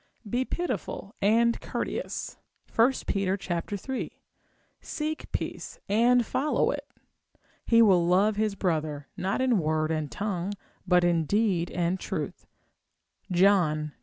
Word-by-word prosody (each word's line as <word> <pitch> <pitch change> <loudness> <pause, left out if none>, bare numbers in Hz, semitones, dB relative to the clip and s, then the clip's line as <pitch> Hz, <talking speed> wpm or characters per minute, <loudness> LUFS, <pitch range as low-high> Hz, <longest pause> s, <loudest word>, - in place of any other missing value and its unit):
Be 245 +5 0
pitiful 300 - -4
and 230 +3 +3
courteous, - - -4 0.4
1 230 +4 +5
Pet. 195 -1 -1 0.4
iii. 265 -1 -4 0.6
Seek 310 0 -4
peace - - -4
and 235 +4 +4
follow 295 +6 +1
it. - - -5 0.8
He 230 0 +6
will 180 -5 +4
love 200 +4 +3
his 210 -1 0
brother, 155 -6 -2
not 195 +7 -1
in 250 -5 +3
word 155 0 0
and 155 -2 -2
tongue, 200 -2 -2 0.3
but 180 -1 +4
in 170 -2 +2
deed 195 -2 +1
and 175 +1 -1
truth, - - -5 0.8
John 175 -5 +3
iii. - - -19
195 Hz, 125 wpm, -27 LUFS, 170-230 Hz, 0.8 s, He